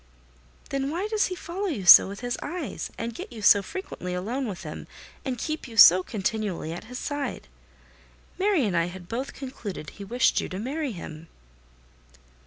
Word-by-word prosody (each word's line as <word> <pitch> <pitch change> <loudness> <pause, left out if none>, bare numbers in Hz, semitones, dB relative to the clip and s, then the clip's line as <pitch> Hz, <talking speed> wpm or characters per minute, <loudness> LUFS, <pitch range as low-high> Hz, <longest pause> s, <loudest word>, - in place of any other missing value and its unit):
"Then 275 0 -1
why 350 +7 -2
does 430 -2 +2
he 370 - -4
follow 370 +3 -4
you 250 - -3
so 175 - +10
with 200 +3 -8
his 245 0 -2
eyes, 330 - -5
and 230 0 -4
get - - -8
you 220 -3 -9
so 205 0 +7
frequently 185 - -6
alone 235 +9 -2
with 195 -5 -6
him, - - -7 0.4
and 260 -2 -3
keep 310 +4 -4
you 230 -2 -11
so 185 -2 +10
continually 200 -5 -3
at 175 - -8
his 250 +2 -8
side? 290 0 -4 0.9
Mary 380 - +3
and 195 -4 -1
I 170 0 +3
had 175 0 -9
both 260 +7 -4
concluded 225 - -7
he 200 - -10
wished 235 +4 +2
you - - -5
to 185 - -5
marry 275 +6 -3
him." 165 -2 -9
235 Hz, 185 wpm, -26 LUFS, 190-280 Hz, 0.9 s, so